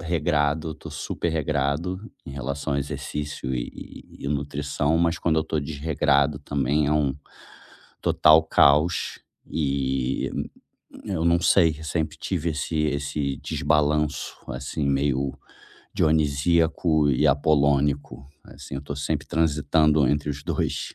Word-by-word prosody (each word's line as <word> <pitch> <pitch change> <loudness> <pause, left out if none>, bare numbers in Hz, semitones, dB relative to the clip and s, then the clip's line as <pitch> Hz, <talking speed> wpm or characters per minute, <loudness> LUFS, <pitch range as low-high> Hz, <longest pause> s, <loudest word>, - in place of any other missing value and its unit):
regrado, 80 -2 0
eu 80 - -5
tô - - -10
super 85 - -3
regrado 75 +4 -1 0.3
em - - -7
relação 70 +2 -3
ao - - +1
exercício 70 -2 -4
e - - -4 0.5
e - - -10
e - - 0
nutrição, 75 +2 -1
mas 85 0 +1
quando 80 -2 +1
eu 80 - 0
tô 80 - -2
desregrado 75 -1 +1
também 70 +1 0
é 75 - +1
um 70 -3 +1 0.9
total 80 +1 +5
caos 75 +2 +3 0.3
e, 65 -3 -1
hum, - - -2 0.6
eu 85 -4 -2
não 85 +1 +3
sei 85 -5 +4
sempre 80 0 -2
tive 85 -3 -2
esse 75 +2 -3
esse 70 -2 -1
desbalanço, 75 0 0
assim, 65 +3 -4
meio 70 -1 0 0.6
Dionisíaco 80 +1 +2
e 65 - +2
Apolônico, 70 -1 +1 0.2
assim, - - -10
eu 70 - -4
tô 70 0 -6
sempre 70 0 -2
transitando 75 -2 +2
entre 75 +2 0
os 70 0 -6
dois. - - -2
75 Hz, 130 wpm, -24 LUFS, 70-80 Hz, 0.9 s, total